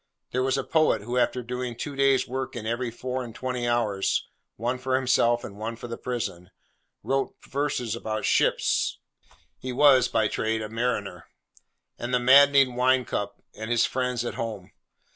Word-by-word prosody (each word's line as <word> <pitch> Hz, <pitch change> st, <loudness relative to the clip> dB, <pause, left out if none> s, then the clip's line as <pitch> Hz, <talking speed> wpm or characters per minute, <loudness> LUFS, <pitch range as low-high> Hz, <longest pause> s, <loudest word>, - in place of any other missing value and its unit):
There 130 Hz, -, 0 dB
was 130 Hz, +1 st, +1 dB
a 135 Hz, -, -1 dB
poet, 155 Hz, -9 st, +2 dB
who 120 Hz, +3 st, -1 dB
after 125 Hz, 0 st, 0 dB
doing 125 Hz, 0 st, -4 dB
two 140 Hz, +4 st, -5 dB
days' 135 Hz, -1 st, +3 dB
work 130 Hz, +1 st, -4 dB
in 115 Hz, -2 st, -5 dB
every 120 Hz, +2 st, -1 dB
four 125 Hz, +2 st, -4 dB
and 115 Hz, -2 st, -9 dB
twenty 125 Hz, 0 st, -3 dB
hours, 110 Hz, -5 st, 0 dB, 0.3 s
one 120 Hz, +3 st, -2 dB
for 130 Hz, 0 st, 0 dB
himself 125 Hz, -2 st, +2 dB
and 100 Hz, 0 st, -9 dB
one 115 Hz, +2 st, -4 dB
for 120 Hz, -, -8 dB
the 115 Hz, -, -5 dB
prison, 105 Hz, -9 st, -4 dB, 0.5 s
wrote 135 Hz, 0 st, -1 dB
verses 135 Hz, -5 st, -1 dB
about 110 Hz, -2 st, -3 dB
ships -, -, +2 dB, 0.6 s
(he 130 Hz, -, -5 dB
was 130 Hz, -1 st, +5 dB
by 110 Hz, -3 st, +1 dB
trade 110 Hz, +1 st, -1 dB
a 105 Hz, -, -6 dB
mariner), 105 Hz, -6 st, -2 dB, 0.7 s
and 120 Hz, +1 st, -1 dB
'the -, -, +3 dB
maddening 135 Hz, +1 st, +6 dB
wine 130 Hz, 0 st, +3 dB
cup,' 100 Hz, -1 st, -4 dB
and 110 Hz, +1 st, -7 dB
his 120 Hz, -1 st, +3 dB
friends 125 Hz, -2 st, -1 dB
at -, -, -3 dB
home. 110 Hz, -5 st, -5 dB
125 Hz, 175 wpm, -26 LUFS, 115-130 Hz, 0.7 s, maddening